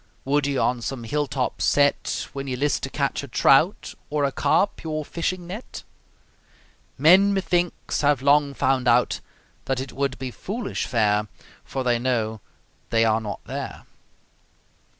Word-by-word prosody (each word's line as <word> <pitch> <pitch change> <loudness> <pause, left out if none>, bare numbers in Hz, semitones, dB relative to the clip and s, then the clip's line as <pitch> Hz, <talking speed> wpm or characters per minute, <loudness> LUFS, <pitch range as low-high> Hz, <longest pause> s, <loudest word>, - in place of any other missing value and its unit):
Would 140 +1 +1
ye 140 -1 -1
on 125 -1 +1
some 125 0 -4
hill 145 +5 -1
top 130 -1 -2
set, 145 0 +1
When 140 0 -5
ye 130 - -2
list 145 +2 0
to - - -4
catch - - -1
a - - -8
trout, - - +3 0.2
Or 150 -1 0
a 140 - +1
carp, 200 +7 +1
your 155 -2 -3
fishing 175 +3 -3
net? 200 +8 -8 1.1
Men, 185 +8 +6
methinks, 175 -2 -1
have 145 -3 +2
long 140 0 +3
found 130 -1 +1
out 120 +1 +3 0.5
That 135 -1 -1
it 130 0 -6
would 135 0 -1
be 130 -1 -5
foolish 220 - -4
fare, 105 -3 +1 0.4
For 135 - -4
they 120 -1 +2
know 110 -4 -1 0.5
they 115 0 +3
are 110 0 +2
not 105 -2 -6
there. - - -6
135 Hz, 155 wpm, -24 LUFS, 125-150 Hz, 1.1 s, Men